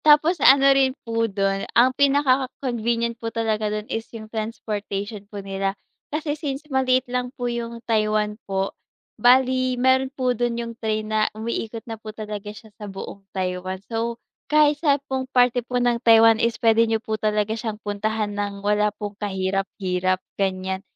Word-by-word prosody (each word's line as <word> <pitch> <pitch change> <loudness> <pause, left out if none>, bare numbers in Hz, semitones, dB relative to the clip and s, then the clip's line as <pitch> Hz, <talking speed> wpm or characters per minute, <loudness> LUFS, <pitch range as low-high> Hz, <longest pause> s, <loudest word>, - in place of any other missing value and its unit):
Tapos 305 +2 +5
ano 275 +1 +7
rin 265 0 +2
po 230 0 0
do'n, 195 0 -1
ang 255 +2 +6
pinaka-convenient 255 -4 +1
po 230 - -2
talaga 220 -2 -1
dun 210 0 -3
is 225 -2 -4
yung 215 - -9
transportation 210 -2 -4
po 200 -2 -7
nila. 195 0 -2 0.3
Kasi 300 0 -2
since 295 -2 -4
maliit 260 -1 +3
lang 250 0 -2
po 245 - -3
yung 235 -1 -4
Taiwan 215 -1 +1 0.2
po, 195 0 -1 0.5
bale 255 0 +4
meron 260 +1 +3
po 255 -2 0
dun 240 0 -1
yung 235 0 -4
train 215 -1 -2
na 215 0 +1
umiikot 225 0 -4
na 225 -2 -7
po 220 - -8
talaga 210 -1 -5
siya 215 0 -12
sa 205 - -6
buong 195 +1 -8
Taiwan. 185 0 -3
So, 230 0 -2 0.3
kahit 300 0 +4
saan 285 -3 +2
pong 265 -1 -3
parte 245 -1 +3
po 250 +1 -3
ng 240 -1 +1
Taiwan 225 -1 +6
is 230 0 +1
puwede 225 -2 +4
niyo 225 - +2
po 220 -1 -4
talaga 215 0 +1
siyang 220 -1 -4
puntahan 210 0 -2
ng 205 -1 -4
wala 210 0 +3
pong 205 -1 -5
kahirap-hirap, 190 -1 -1 0.2
ganiyan. 190 -1 -2
225 Hz, 165 wpm, -23 LUFS, 210-250 Hz, 0.5 s, ano